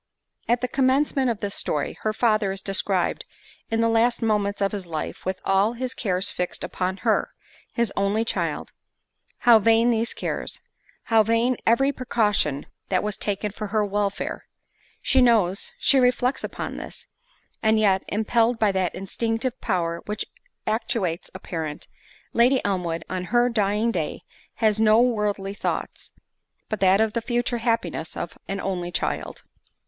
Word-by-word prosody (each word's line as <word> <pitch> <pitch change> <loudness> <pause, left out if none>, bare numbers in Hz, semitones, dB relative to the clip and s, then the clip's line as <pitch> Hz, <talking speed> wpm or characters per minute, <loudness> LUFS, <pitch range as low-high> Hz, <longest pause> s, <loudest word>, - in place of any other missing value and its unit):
At 240 +1 +2
the 250 - 0
commencement 265 +1 +2
of 225 -3 -2
this 200 -2 -2
story, 150 - -2
her 215 - 0
father 215 -3 +2
is 195 0 -6
described 195 -2 0 0.5
in 225 0 +1
the 230 - +3
last 230 +1 +2
moments 205 -2 +1
of 200 -1 +1
his 195 -4 -5
life, 160 -2 -5
with 190 0 -2
all 195 +4 +3
his 255 +1 -4
cares 190 -4 0
fixed 180 0 -3
upon 185 +1 -2
her, - - +2 0.4
his 235 -4 -1
only 200 +3 +1
child—how 235 0 0
vain 225 +3 +4
these 230 0 0
cares! - - -4 0.4
how 225 -1 +4
vain 230 +3 +2
every 270 +5 +4
precaution 210 - 0 0.2
that 185 -1 +1
was 210 -1 -1
taken 205 0 -2
for 210 +1 -5
her 210 +1 +1
welfare! 200 0 -2 0.6
She 265 - +4
knows, 215 -6 +3
she 270 0 +4
reflects 250 +1 +2
upon - - -5
this; - - -8 0.6
and 220 0 +3
yet, 195 -3 +3
impelled 225 +3 +1
by 215 -2 +3
that 185 -2 -1
instinctive 225 +6 -2
power 170 -5 -1
which 210 0 -3 0.4
actuates 215 -6 -1
a - - -6
parent, 160 -6 -5 0.5
Lady 250 +3 +4
Elmwood 175 -4 -1
on 185 -1 -3
her 240 +5 +3
dying 215 0 +1
day - - -3 0.3
has 220 -2 +2
no 220 0 +5
worldly 210 -5 +1
thoughts, - - -4 0.6
but 215 - -2
that 190 +1 +4
of 220 -1 +2
the 235 - -1
future 240 +1 -1
happiness 225 -9 -1
of 170 - -5
an 195 0 -3
only 180 -3 -3
child. - - -3
215 Hz, 155 wpm, -24 LUFS, 195-235 Hz, 0.6 s, no